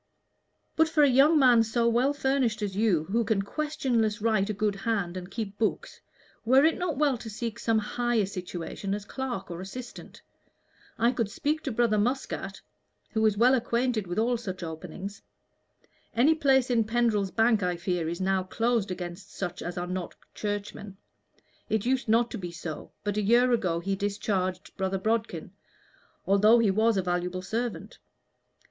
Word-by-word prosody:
"But 320 Hz, 0 st, +3 dB
for 310 Hz, -2 st, +4 dB
a -, -, +7 dB
young 275 Hz, +5 st, +5 dB
man 250 Hz, -5 st, +6 dB
so 230 Hz, +1 st, +1 dB
well 240 Hz, +4 st, +3 dB
furnished 265 Hz, -6 st, 0 dB
as 195 Hz, -2 st, -3 dB
you, 200 Hz, -7 st, +2 dB
who 225 Hz, +8 st, 0 dB
can 210 Hz, -2 st, 0 dB
questionless 240 Hz, -5 st, -1 dB
write 215 Hz, -2 st, +1 dB
a -, -, 0 dB
good 210 Hz, 0 st, 0 dB
hand 195 Hz, -4 st, -1 dB
and 180 Hz, 0 st, -6 dB
keep 205 Hz, -2 st, -5 dB
books, 220 Hz, -, -2 dB, 0.4 s
were 260 Hz, +5 st, +5 dB
it 320 Hz, -, +3 dB
not 350 Hz, -6 st, -2 dB
well 280 Hz, -5 st, +2 dB
to 225 Hz, -, -7 dB
seek 230 Hz, +2 st, -5 dB
some 225 Hz, -1 st, +1 dB
higher 235 Hz, 0 st, 0 dB
situation 185 Hz, +1 st, -5 dB
as 205 Hz, -1 st, -7 dB
clerk 245 Hz, -7 st, -5 dB
or 170 Hz, +1 st, -6 dB
assistant? 240 Hz, +6 st, -9 dB, 0.7 s
I 235 Hz, +1 st, +3 dB
could 230 Hz, -4 st, -1 dB
speak 305 Hz, +5 st, -1 dB
to 270 Hz, -, -1 dB
Brother 220 Hz, -2 st, +2 dB
Muscat, 210 Hz, -4 st, -2 dB, 0.5 s
who 220 Hz, -1 st, 0 dB
is 210 Hz, -1 st, 0 dB
well 245 Hz, +4 st, +5 dB
acquainted 235 Hz, -4 st, 0 dB
with 175 Hz, -, -4 dB
all 235 Hz, +2 st, +2 dB
such 185 Hz, -6 st, -6 dB
openings. 180 Hz, +4 st, -7 dB, 0.9 s
Any 265 Hz, +7 st, +5 dB
place 265 Hz, -5 st, +2 dB
in 230 Hz, -2 st, +3 dB
Pendrell's 220 Hz, -3 st, +1 dB
Bank, 225 Hz, +1 st, +3 dB
I 180 Hz, -1 st, 0 dB
fear, 175 Hz, -2 st, -1 dB
is 170 Hz, -, -4 dB
now 190 Hz, 0 st, +1 dB
closed 225 Hz, +2 st, 0 dB
against 180 Hz, +1 st, -6 dB
such 180 Hz, -1 st, -5 dB
as 175 Hz, +1 st, -5 dB
are 175 Hz, -, -2 dB
not 180 Hz, 0 st, -5 dB, 0.2 s
Churchmen. 205 Hz, -1 st, -5 dB, 0.7 s
It 220 Hz, -1 st, 0 dB
used 260 Hz, -1 st, 0 dB
not 230 Hz, +2 st, +3 dB
to 230 Hz, -, -5 dB
be 180 Hz, -2 st, -5 dB
so, 165 Hz, -2 st, -7 dB
but 205 Hz, 0 st, -2 dB
a -, -, +2 dB
year 240 Hz, +4 st, +4 dB
ago 185 Hz, -8 st, +1 dB
he 195 Hz, +3 st, -2 dB
discharged 195 Hz, -2 st, -2 dB
Brother 190 Hz, 0 st, -1 dB
Bodkin, 220 Hz, +3 st, -2 dB, 0.7 s
although 210 Hz, +4 st, +5 dB
he 225 Hz, -4 st, +3 dB
was 220 Hz, +2 st, +2 dB
a 190 Hz, -, +1 dB
valuable 180 Hz, +1 st, -2 dB
servant. 230 Hz, +4 st, -4 dB
215 Hz, 175 wpm, -27 LUFS, 190-240 Hz, 0.9 s, a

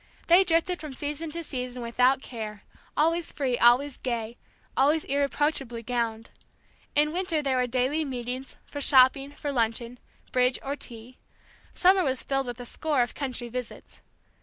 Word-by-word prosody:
They 350 Hz, +3 st, +7 dB
drifted 345 Hz, 0 st, +1 dB
from 300 Hz, -4 st, -7 dB
season 300 Hz, +3 st, -4 dB
to 335 Hz, +2 st, -4 dB
season 250 Hz, -4 st, -5 dB
without 250 Hz, +3 st, +2 dB
care, 215 Hz, -4 st, -7 dB, 0.3 s
always 330 Hz, +2 st, +2 dB
free, 260 Hz, -4 st, -1 dB
always 250 Hz, +4 st, +4 dB
gay, 235 Hz, -2 st, -3 dB, 0.4 s
always 295 Hz, +4 st, +3 dB
irreproachably 275 Hz, -3 st, -1 dB
gowned. 230 Hz, -2 st, -2 dB, 0.6 s
In 300 Hz, +1 st, +3 dB
winter 350 Hz, -4 st, 0 dB
there 265 Hz, -2 st, +1 dB
were 250 Hz, 0 st, +1 dB
daily 260 Hz, +6 st, +1 dB
meetings, 255 Hz, -1 st, -5 dB
for 285 Hz, -, -7 dB
shopping, 270 Hz, 0 st, +5 dB
for 290 Hz, 0 st, -4 dB
luncheon, 235 Hz, 0 st, -1 dB, 0.3 s
bridge 250 Hz, 0 st, +2 dB
or 280 Hz, +1 st, -2 dB
tea; 240 Hz, -2 st, -9 dB, 0.6 s
summer 375 Hz, +1 st, +5 dB
was 265 Hz, -4 st, -1 dB
filled 270 Hz, -1 st, -1 dB
with 245 Hz, 0 st, -5 dB
a 245 Hz, -, -6 dB
score 290 Hz, 0 st, 0 dB
of 240 Hz, -, -5 dB
country 255 Hz, -4 st, -3 dB
visits. 250 Hz, 0 st, -7 dB
265 Hz, 155 wpm, -27 LUFS, 245-295 Hz, 0.6 s, They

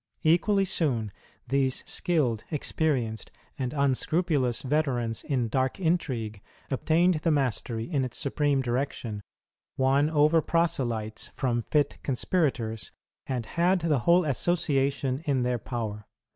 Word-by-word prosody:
Equally 195 Hz, +5 st, +3 dB
soon, 130 Hz, -, 0 dB, 0.4 s
these 130 Hz, 0 st, 0 dB
skilled, 130 Hz, -11 st, 0 dB
experienced, 135 Hz, -8 st, -1 dB, 0.3 s
and 130 Hz, -2 st, -1 dB
unscrupulous 140 Hz, -1 st, +1 dB
veterans 130 Hz, -5 st, 0 dB
in 130 Hz, -6 st, 0 dB
dark 130 Hz, -, 0 dB
intrigue 130 Hz, -, -1 dB, 0.3 s
obtained 165 Hz, +5 st, +2 dB
the 165 Hz, -, +1 dB
mastery 125 Hz, -6 st, 0 dB
in 145 Hz, -6 st, 0 dB
its 125 Hz, -, -4 dB
supreme 140 Hz, 0 st, +1 dB
direction, 120 Hz, -4 st, -2 dB, 0.6 s
won 135 Hz, +3 st, +3 dB
over 155 Hz, +1 st, +4 dB
proselytes 120 Hz, -11 st, -1 dB
from 120 Hz, -4 st, 0 dB
fit 145 Hz, +4 st, 0 dB
conspirators, 125 Hz, -, -1 dB, 0.4 s
and 125 Hz, -4 st, -2 dB
had 175 Hz, +7 st, +1 dB
the 155 Hz, -5 st, +2 dB
whole 170 Hz, +7 st, +4 dB
association 140 Hz, -2 st, 0 dB
in 135 Hz, -4 st, +1 dB
their 125 Hz, -1 st, 0 dB
power. 110 Hz, -4 st, -5 dB
135 Hz, 115 wpm, -27 LUFS, 120-155 Hz, 0.6 s, over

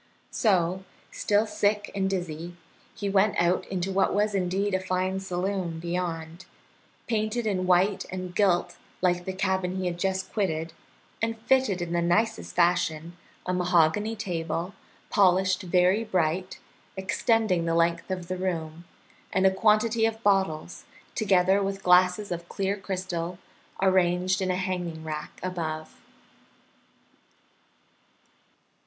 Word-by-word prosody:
So, 185 Hz, -4 st, +1 dB, 0.3 s
still 205 Hz, +1 st, +1 dB
sick 210 Hz, -1 st, 0 dB
and 195 Hz, -1 st, 0 dB
dizzy, 175 Hz, -2 st, -4 dB, 0.4 s
he 205 Hz, -, -3 dB
went 200 Hz, +1 st, +2 dB
out 175 Hz, +1 st, +1 dB
into 190 Hz, 0 st, -2 dB
what 195 Hz, 0 st, +2 dB
was 210 Hz, 0 st, +1 dB
indeed 195 Hz, +1 st, 0 dB
a 190 Hz, -, +2 dB
fine 185 Hz, +1 st, -1 dB
saloon 185 Hz, -2 st, -3 dB
beyond, 170 Hz, 0 st, -4 dB, 0.6 s
painted 220 Hz, +1 st, -1 dB
in 185 Hz, -4 st, 0 dB
white 185 Hz, +2 st, +3 dB
and 185 Hz, -1 st, -5 dB
gilt 180 Hz, -3 st, +2 dB, 0.3 s
like 180 Hz, -1 st, +2 dB
the 190 Hz, -, -2 dB
cabin 190 Hz, -1 st, -1 dB
he 190 Hz, -1 st, -2 dB
had 175 Hz, -1 st, -2 dB
just 190 Hz, 0 st, -2 dB
quitted, 165 Hz, -6 st, -1 dB, 0.5 s
and 225 Hz, 0 st, -1 dB
fitted 225 Hz, -7 st, +2 dB
in 170 Hz, 0 st, -4 dB
the 170 Hz, -, +1 dB
nicest 220 Hz, +6 st, 0 dB
fashion, 170 Hz, -2 st, +1 dB, 0.3 s
a 180 Hz, -, -1 dB
mahogany 180 Hz, +4 st, +2 dB
table, 175 Hz, -2 st, -3 dB, 0.4 s
polished 185 Hz, -2 st, +3 dB
very 185 Hz, +4 st, +3 dB
bright, 180 Hz, -2 st, -1 dB, 0.4 s
extending 190 Hz, -2 st, +1 dB
the 165 Hz, 0 st, 0 dB
length 170 Hz, +1 st, +1 dB
of 180 Hz, -2 st, -4 dB
the 185 Hz, +1 st, -3 dB
room, 170 Hz, -3 st, -3 dB, 0.5 s
and 190 Hz, 0 st, +2 dB
a 190 Hz, -, +6 dB
quantity 220 Hz, +3 st, +3 dB
of 225 Hz, 0 st, -5 dB
bottles, 190 Hz, -5 st, 0 dB, 0.3 s
together 195 Hz, -2 st, +3 dB
with 195 Hz, 0 st, -3 dB
glasses 180 Hz, +3 st, +4 dB
of 170 Hz, 0 st, -5 dB
clear 195 Hz, 0 st, -1 dB
crystal, 180 Hz, -3 st, -4 dB, 0.5 s
arranged 185 Hz, 0 st, +2 dB
in 185 Hz, -, 0 dB
a 185 Hz, -, +1 dB
hanging 180 Hz, -3 st, -3 dB
rack 155 Hz, -1 st, -6 dB
above. 160 Hz, -4 st, -4 dB
185 Hz, 130 wpm, -27 LUFS, 175-195 Hz, 0.6 s, a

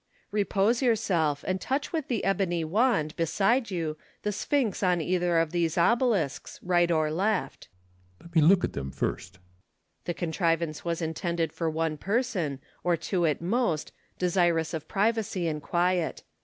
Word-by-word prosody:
Repose 210 Hz, +3 st, +1 dB
yourself, 180 Hz, -, +1 dB
and 185 Hz, 0 st, -1 dB
touch 280 Hz, +6 st, -2 dB
with 315 Hz, -4 st, -2 dB
the 235 Hz, -4 st, -1 dB
ebony 190 Hz, -4 st, +1 dB
wand, 170 Hz, -3 st, +1 dB
beside 205 Hz, +9 st, +1 dB
you, 165 Hz, -5 st, -3 dB, 0.3 s
the 210 Hz, -, 0 dB
sp'hynx 235 Hz, 0 st, 0 dB
on 180 Hz, -3 st, +2 dB
either 175 Hz, +1 st, +1 dB
of 165 Hz, -1 st, +2 dB
those 170 Hz, -2 st, 0 dB
obelisks, 205 Hz, -, +1 dB
right 175 Hz, -1 st, +3 dB
or 155 Hz, -2 st, +2 dB
left, 185 Hz, -3 st, -1 dB, 0.5 s
Ccesar. -, -, -21 dB
Let 170 Hz, 0 st, -15 dB
me 160 Hz, -, +6 dB
look 180 Hz, +4 st, +5 dB
at -, -, -1 dB
them 70 Hz, -1 st, -4 dB
first, -, -, -3 dB
Lucullus. 90 Hz, 0 st, -33 dB
The 175 Hz, -, -1 dB
contrivance 165 Hz, -2 st, -1 dB
was 170 Hz, 0 st, -2 dB
intended 165 Hz, 0 st, -2 dB
for 165 Hz, -2 st, -1 dB
one 160 Hz, -1 st, -1 dB
person, 195 Hz, -, -1 dB, 0.3 s
or 175 Hz, -1 st, +2 dB
two 175 Hz, 0 st, 0 dB
at 155 Hz, +2 st, -1 dB
most, 190 Hz, -5 st, 0 dB, 0.3 s
desirous 175 Hz, -3 st, +1 dB
of 160 Hz, -2 st, -4 dB
privacy 205 Hz, -4 st, 0 dB
and 150 Hz, -2 st, -2 dB
quiet. 175 Hz, +1 st, 0 dB
175 Hz, 160 wpm, -28 LUFS, 160-200 Hz, 0.5 s, me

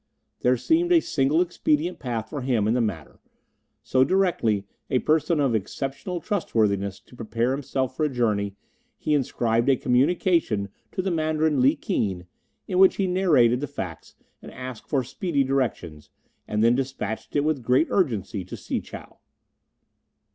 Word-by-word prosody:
There 125 Hz, +1 st, +2 dB
seemed 335 Hz, -, +1 dB
a 345 Hz, -, +7 dB
single 145 Hz, -, +1 dB
expedient 170 Hz, -1 st, 0 dB
path 115 Hz, -5 st, -3 dB
for 145 Hz, -, -4 dB
him 120 Hz, -5 st, +1 dB
in 110 Hz, -, +2 dB
the 125 Hz, -, +2 dB
matter; 95 Hz, -9 st, -4 dB, 0.6 s
so, 130 Hz, 0 st, +3 dB
directing 150 Hz, -, +1 dB, 0.3 s
a 130 Hz, -, +2 dB
person 155 Hz, +3 st, +1 dB
of 135 Hz, -4 st, +2 dB
exceptional 135 Hz, -, -3 dB
trustworthiness 105 Hz, -, 0 dB
to -, -, -18 dB
prepare 115 Hz, +1 st, -1 dB
himself 130 Hz, -1 st, -2 dB
for 155 Hz, -, 0 dB
a -, -, +1 dB
journey, 105 Hz, -6 st, 0 dB, 0.4 s
he 150 Hz, -, -1 dB
inscribed 120 Hz, -3 st, +1 dB
a 135 Hz, -, +5 dB
communication 130 Hz, -, +1 dB, 0.2 s
to 185 Hz, -, -2 dB
the 190 Hz, -, -1 dB
Mandarin 155 Hz, -3 st, +1 dB
Li 130 Hz, -, +4 dB
Keen, 95 Hz, -4 st, -2 dB, 0.4 s
in 180 Hz, -, 0 dB
which 190 Hz, 0 st, +6 dB
he 195 Hz, -, 0 dB
narrated 155 Hz, -11 st, +3 dB
the 145 Hz, -, -3 dB
facts 90 Hz, -, -7 dB, 0.3 s
and -, -, -10 dB
asked 125 Hz, -2 st, -8 dB
for 135 Hz, -4 st, +1 dB
speedy 140 Hz, +3 st, -1 dB
directions, 120 Hz, -, -2 dB, 0.4 s
and 105 Hz, +1 st, 0 dB
then 115 Hz, +1 st, +5 dB
despatched 125 Hz, -5 st, -4 dB
it 145 Hz, -, +3 dB
with 155 Hz, -3 st, 0 dB
great 125 Hz, +6 st, +3 dB
urgency 110 Hz, -, 0 dB
to 90 Hz, -, -8 dB
Si -, -, -3 dB
chow. -, -, -11 dB
130 Hz, 160 wpm, -25 LUFS, 115-155 Hz, 0.6 s, a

